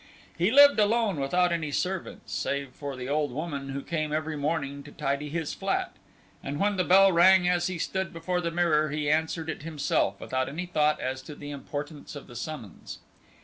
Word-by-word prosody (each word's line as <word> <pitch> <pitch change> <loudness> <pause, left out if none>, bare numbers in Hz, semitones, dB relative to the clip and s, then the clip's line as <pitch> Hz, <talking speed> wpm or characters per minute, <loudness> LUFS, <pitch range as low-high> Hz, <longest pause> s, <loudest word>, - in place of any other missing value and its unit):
He 175 +4 +2
lived 285 +1 +7
alone 210 -4 +2
without 175 +6 +2
any 165 -3 -1
servants 185 +5 -3
save 140 -1 -2
for 140 +1 -6
the 125 0 -6
old 145 0 0
woman 140 -1 -4
who 135 0 -4
came 155 -2 -2
every 155 +1 -2
morning 140 -1 -2
to 145 - -12
tidy 145 0 -2
his 160 0 -3
flat, - - -2 0.5
and 145 +2 -4
when 205 0 +2
the 185 - +1
bell 195 +2 +6
rang 180 +1 +6
as 175 -1 +2
he 185 -1 -3
stood 190 +2 -2
before 180 +2 -2
the 170 - -1
mirror, 165 -3 +2
he 150 0 -1
answered 160 +1 0
it 160 - -4
himself 145 -10 0
without 130 0 -2
any 165 +6 -4
thought 150 -4 +1
as 130 +1 -3
to 145 +3 -10
the 145 0 -8
importance 145 +2 -6
of 145 - -8
the 120 - -13
summons. 120 - -7
155 Hz, 195 wpm, -27 LUFS, 140-175 Hz, 0.5 s, lived